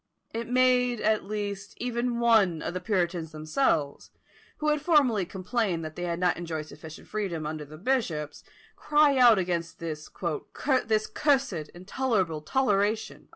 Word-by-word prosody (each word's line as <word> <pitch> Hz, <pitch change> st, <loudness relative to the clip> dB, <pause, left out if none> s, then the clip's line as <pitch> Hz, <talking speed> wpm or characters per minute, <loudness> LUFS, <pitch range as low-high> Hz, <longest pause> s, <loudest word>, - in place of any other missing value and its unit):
It 230 Hz, +1 st, -4 dB
made, 250 Hz, -1 st, +3 dB
at 215 Hz, -1 st, +1 dB
least, 200 Hz, -1 st, -5 dB
even 240 Hz, 0 st, -2 dB
one 215 Hz, -9 st, +3 dB
of -, -, -3 dB
the 185 Hz, -, -2 dB
puritans 175 Hz, -4 st, -1 dB
themselves, 155 Hz, -, -1 dB, 0.5 s
who 305 Hz, -, 0 dB
had 300 Hz, -1 st, +1 dB
formerly 255 Hz, -, +3 dB
complained 185 Hz, -3 st, -2 dB
that 155 Hz, 0 st, -7 dB
they 175 Hz, -, -4 dB
had 170 Hz, -1 st, -2 dB
not 180 Hz, 0 st, +1 dB
enjoyed 165 Hz, -3 st, -4 dB
sufficient 155 Hz, 0 st, -11 dB
freedom 190 Hz, -7 st, -3 dB
under 155 Hz, 0 st, -4 dB
the 155 Hz, +2 st, -12 dB
bishops, 170 Hz, -, -2 dB, 0.3 s
cry 295 Hz, -1 st, +3 dB
out 240 Hz, -3 st, +7 dB
against 175 Hz, -2 st, -2 dB
"this 155 Hz, -2 st, -6 dB
cursed 220 Hz, -, 0 dB
intolerable 185 Hz, -4 st, -1 dB
toleration." 215 Hz, -, 0 dB
200 Hz, 140 wpm, -27 LUFS, 165-245 Hz, 0.5 s, out